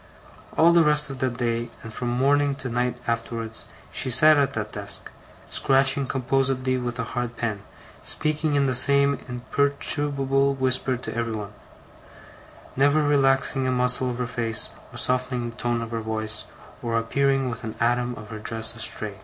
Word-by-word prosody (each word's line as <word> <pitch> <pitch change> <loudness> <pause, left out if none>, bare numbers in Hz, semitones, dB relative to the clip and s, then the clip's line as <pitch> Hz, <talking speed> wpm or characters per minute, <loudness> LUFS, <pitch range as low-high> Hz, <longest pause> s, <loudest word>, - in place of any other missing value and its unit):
All 165 +1 +6
the 170 -1 +5
rest 150 -2 +5
of 135 - -7
that 125 -2 -1
day, 120 -1 -1
and 115 -1 -9
from 125 - -4
morning 140 +3 +2
to 135 -2 -5
night 125 +1 -1
afterwards, 115 -1 -4 0.3
she - - -2
sat 155 +5 +8
at 140 -1 +1
that - - -4
desk, - - -4 0.4
scratching 135 0 +2
composedly 130 0 0
with 120 -1 -4
a 120 - -2
hard 120 0 -4
pen, 110 -3 -2 0.4
speaking 155 -1 0
in 140 -1 +3
the 130 - 0
same 140 +2 +4
imperturbable 140 +1 0
whisper 130 -1 +1
to 120 - -7
everybody; 110 -3 -4 1.2
never 145 +3 +3
relaxing 135 -2 +2
a - - +1
muscle 125 0 +3
of 120 - -4
her 125 - -2
face, 115 -2 -1 0.2
or - - -10
softening 125 -1 0
a - - -8
tone 120 0 -2
of 115 - -8
her 115 -1 -3
voice, 110 0 -4 0.4
or 115 -1 -1
appearing 135 +3 +1
with 115 - -8
an 110 -1 -6
atom 120 +1 0
of 105 -1 -11
her 110 - -6
dress 110 +1 +1
astray. 110 -2 -2
125 Hz, 170 wpm, -24 LUFS, 115-135 Hz, 1.2 s, sat